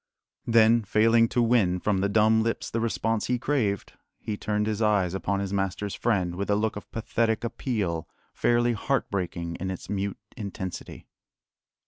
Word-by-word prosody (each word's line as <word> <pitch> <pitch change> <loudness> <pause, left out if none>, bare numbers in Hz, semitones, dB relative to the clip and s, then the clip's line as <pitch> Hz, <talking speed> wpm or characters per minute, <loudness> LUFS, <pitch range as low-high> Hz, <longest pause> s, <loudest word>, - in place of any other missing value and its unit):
Then, 115 0 +5
failing 115 +2 +4
to 120 +1 +1
win 110 -7 +3
from 100 0 0
the 100 +1 +1
dumb 110 +1 +4
lips 115 +1 -2
the 115 - -1
response 115 -1 -1
he 125 - +1
craved, 120 -7 -1 0.2
he 105 - -4
turned 105 0 -1
his 110 0 -2
eyes 100 -5 +2
upon 100 +1 -1
his 100 0 -3
master's 100 +1 -2
friend 95 -7 0
with 100 +3 -4
a 105 - +4
look 110 +1 0
of 100 - -9
pathetic 115 0 0
appeal 105 - -2 0.2
fairly 120 0 +2
heartbreaking 95 -8 -2
in 95 - -4
its 95 +1 -6
mute 100 -1 -2 0.2
intensity. 95 -4 -6
105 Hz, 160 wpm, -26 LUFS, 95-115 Hz, 0.2 s, Then